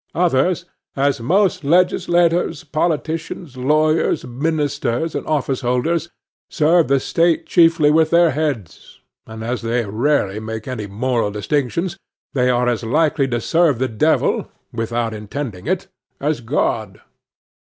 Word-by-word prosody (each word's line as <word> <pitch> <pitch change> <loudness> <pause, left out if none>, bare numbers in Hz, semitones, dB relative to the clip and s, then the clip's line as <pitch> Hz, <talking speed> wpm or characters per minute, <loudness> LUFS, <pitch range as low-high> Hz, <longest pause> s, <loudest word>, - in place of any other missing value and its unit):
Others, 170 +1 +1 0.3
as 140 -1 +1
most 185 - +1
legislators, 175 0 +2
politicians, 160 -1 -3
lawyers, 155 +5 +1
ministers, 145 +1 -1
and - - -4
office 140 -4 -1
holders, 145 +7 0 0.4
serve 165 0 +3
the 135 +1 +3
state 165 +4 +1
chiefly 165 -3 +4
with 160 0 +3
their 170 -1 +4
heads; 140 - -4 0.3
and, 110 0 -8
as 120 +2 -3
they 115 0 -1
rarely 110 -1 0
make 110 +1 -6
any 115 -5 -4
moral 115 +2 -1
distinctions, 145 - -2 0.4
they 125 -2 +2
are 125 0 +2
as 120 -1 0
likely 145 +3 +1
to 120 -2 -1
serve 165 +2 +2
the 130 +2 0
devil, 110 -3 +1 0.2
without 115 0 -2
intending 110 0 -6
it, 185 +2 -1 0.3
as 145 -3 -1
God. 110 -5 -2
140 Hz, 130 wpm, -19 LUFS, 120-165 Hz, 0.4 s, chiefly